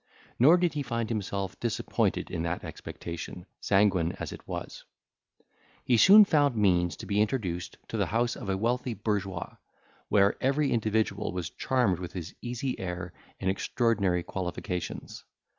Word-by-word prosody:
Nor 150 Hz, +9 st, +7 dB
did 175 Hz, -1 st, +1 dB
he 150 Hz, -, -2 dB
find 115 Hz, -4 st, -2 dB
himself 100 Hz, -3 st, -3 dB
disappointed 120 Hz, -2 st, -1 dB
in 80 Hz, -, -2 dB
that 85 Hz, +1 st, -2 dB
expectation, 85 Hz, +1 st, -7 dB
sanguine 95 Hz, -4 st, +2 dB
as -, -, -6 dB
it -, -, -10 dB
was. -, -, -6 dB, 1.0 s
He 125 Hz, -, +4 dB
soon 200 Hz, -, +9 dB
found 145 Hz, -8 st, +3 dB
means 90 Hz, -5 st, +2 dB
to -, -, -9 dB
be 105 Hz, 0 st, +1 dB
introduced 95 Hz, -6 st, -2 dB
to 115 Hz, -, -3 dB
the 100 Hz, -4 st, +1 dB
house 115 Hz, +5 st, 0 dB
of 100 Hz, -, -7 dB
a 95 Hz, -, +1 dB
wealthy 120 Hz, +3 st, -1 dB
bourgeois, 100 Hz, -3 st, -3 dB, 0.5 s
where 100 Hz, -1 st, +4 dB
every 140 Hz, +2 st, +2 dB
individual 110 Hz, -2 st, 0 dB
was 90 Hz, -2 st, -4 dB
charmed 120 Hz, -9 st, +1 dB
with 90 Hz, -1 st, -6 dB
his 90 Hz, 0 st, -6 dB
easy 125 Hz, +2 st, -3 dB
air 90 Hz, -1 st, -5 dB, 0.3 s
and 95 Hz, -, -3 dB
extraordinary 100 Hz, -4 st, +1 dB
qualifications. 90 Hz, -1 st, -5 dB
105 Hz, 150 wpm, -28 LUFS, 90-120 Hz, 1.0 s, soon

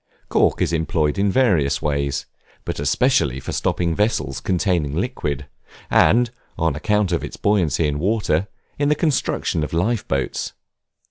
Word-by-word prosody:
Cork -, -, +2 dB
is 85 Hz, -, -1 dB
employed 80 Hz, -1 st, 0 dB
in 100 Hz, 0 st, +2 dB
various 80 Hz, -, +2 dB
ways, 70 Hz, -2 st, -1 dB, 0.4 s
but -, -, -4 dB
especially 70 Hz, -, +2 dB
for -, -, -6 dB
stopping 85 Hz, -2 st, 0 dB
vessels 105 Hz, -, 0 dB
containing 85 Hz, -5 st, 0 dB
liquids, 75 Hz, -, -2 dB, 0.5 s
and, 120 Hz, +1 st, +4 dB, 0.3 s
on 80 Hz, -3 st, +1 dB
account 105 Hz, +3 st, +1 dB
of 85 Hz, -, 0 dB
its -, -, -7 dB
buoyancy 85 Hz, -7 st, +2 dB
in 75 Hz, 0 st, -2 dB
water, 100 Hz, -2 st, +1 dB, 0.3 s
in 145 Hz, 0 st, +2 dB
the 150 Hz, -, +3 dB
construction 145 Hz, -, 0 dB
of 75 Hz, -, -5 dB
life 105 Hz, +7 st, 0 dB
boats. 70 Hz, -1 st, -2 dB
85 Hz, 145 wpm, -21 LUFS, 75-105 Hz, 0.5 s, and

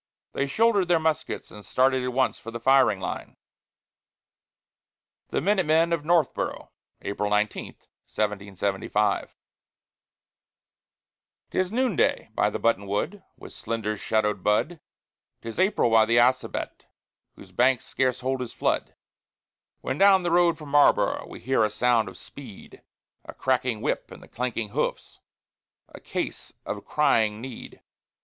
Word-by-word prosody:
They 140 Hz, -, -1 dB
shouldered 205 Hz, +3 st, +2 dB
their 175 Hz, -1 st, +4 dB
muskets 160 Hz, -1 st, -2 dB
and 105 Hz, -, -11 dB
started 130 Hz, +2 st, +2 dB
at 125 Hz, -, -2 dB
once 130 Hz, +1 st, 0 dB
for 115 Hz, -, -9 dB
the 115 Hz, 0 st, -6 dB
firing 130 Hz, -5 st, +4 dB
line. -, -, -6 dB, 1.9 s
THE -, -, -1 dB
MINUTE 195 Hz, -4 st, +1 dB
MEN 165 Hz, +2 st, +3 dB
OF 165 Hz, -, 0 dB
NORTHBORO' 165 Hz, -3 st, 0 dB, 0.3 s
[April 105 Hz, +1 st, -2 dB
19, 105 Hz, 0 st, 0 dB, 0.4 s
1775] 100 Hz, 0 st, -1 dB, 2.2 s
'Tis 185 Hz, 0 st, 0 dB
noonday 245 Hz, -, +1 dB
by -, -, +2 dB
the -, -, -4 dB
buttonwood, 115 Hz, -, -1 dB, 0.2 s
with -, -, -12 dB
slender 110 Hz, -1 st, -3 dB
shadowed 105 Hz, -2 st, -1 dB
bud; 150 Hz, +11 st, +1 dB, 0.6 s
'Tis 115 Hz, +6 st, -6 dB
April 185 Hz, -, +2 dB
by 110 Hz, -1 st, +6 dB
the 115 Hz, +1 st, +3 dB
Assabet, 125 Hz, +2 st, +1 dB, 0.5 s
whose -, -, -15 dB
banks 125 Hz, 0 st, +2 dB
scarce 130 Hz, -1 st, -1 dB
hold 130 Hz, 0 st, -1 dB
his 120 Hz, -2 st, -6 dB
flood; -, -, -1 dB, 0.9 s
When 130 Hz, -, -3 dB
down 195 Hz, -2 st, +6 dB
the 175 Hz, -, -1 dB
road 170 Hz, -1 st, +4 dB
from 150 Hz, -3 st, -10 dB
Marlboro' 145 Hz, 0 st, +3 dB
we -, -, -9 dB
hear 130 Hz, -2 st, +2 dB
a 105 Hz, -, +2 dB
sound 115 Hz, -1 st, +1 dB
of 90 Hz, -, -13 dB
speed 125 Hz, -8 st, -12 dB, 0.4 s
A -, -, -10 dB
cracking 125 Hz, -4 st, 0 dB
whip -, -, -2 dB
and -, -, -14 dB
clanking 115 Hz, -3 st, -3 dB
hoofs -, -, -3 dB, 0.7 s
a -, -, -12 dB
case -, -, -5 dB
of 105 Hz, -, -5 dB
crying 110 Hz, -8 st, +2 dB
need! 125 Hz, 0 st, -10 dB
125 Hz, 135 wpm, -25 LUFS, 105-155 Hz, 2.2 s, by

